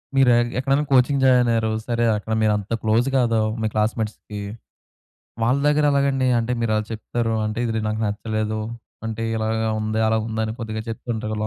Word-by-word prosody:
మీరు 135 -2 +5
ఎ - - +5 0.2
ఎక్కడైనా 135 +3 +1
coaching 135 +1 +4
join 125 -2 +5
అయ్యారు. 110 -1 +1 0.2
సరే! 120 -1 +1
అక్కడ 110 +2 -4
మీరు 110 -1 +3
అంత 105 +1 -8
క్లోజ్ 110 +3 +2
కాదు, 115 -3 +2 0.2
మీ 110 - +1
క్లాస్‌మేట్స్‌కి. 105 -1 -2 1.0
వాళ్ళ 125 +4 +3
దగ్గర 150 0 +3
ఎలాగండి? 140 -2 +2
అంటే 115 +1 -1
మీరు 115 -2 0
అలా 110 - 0
చెప్తారు. 115 +1 -2
అంటే 110 +1 -3
ఇది 110 -1 -1
నాకు 110 +1 -2
నచ్చలేదు. 110 +1 -2 0.5
అంటే 110 0 -4
ఇలాగా 110 0 0
ఉంది. 110 +1 -1
అలా 110 0 +2
ఉంది. 110 -1 -3
అని 110 - -3
కొద్దిగా 110 -1 -4
చెప్తుంటారు. 110 -1 -4
110 Hz, 175 wpm, -22 LUFS, 110-125 Hz, 1.0 s, మీరు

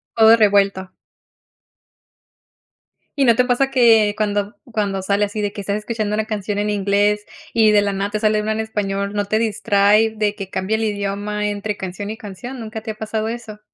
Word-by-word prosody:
Todo 225 0 +7
revuelto. 200 -3 +2 2.2
¿Y 275 - +2
no 235 -2 +5
te 250 - +3
pasa 270 +2 +1
que 225 -5 +5
cuando 205 -1 0
b - - -17 0.2
cuando 200 -3 -1
sale 200 +2 +1
así 210 +1 -5
de 205 - -1
que 205 - -7
estás 200 +1 -2
escuchando 215 -1 -3
una 215 0 0
canción 205 -2 -3
en 210 - 0
inglés 205 +1 +1 0.3
y 220 -2 +5
de 205 -1 +5
la 200 0 0
nada 200 +1 -2
te 215 - -2
sale 215 0 +2
una 215 - -2
en 220 - -2
español, 200 -2 -2
no 205 0 -1
te 215 +2 0
distrae 215 -1 +3
de 210 -1 0
que 195 -3 -7
cambia 195 +4 -1
el 220 - -1
idioma 205 0 -2
entre 205 0 -3
canción 190 +2 -6
y 220 - -7
canción?, 225 +6 -8
¿nunca 220 -1 -6
te 220 0 -5
ha - - -9
pasado 220 0 -3
eso? 225 -2 -7
210 Hz, 200 wpm, -20 LUFS, 200-220 Hz, 2.2 s, Todo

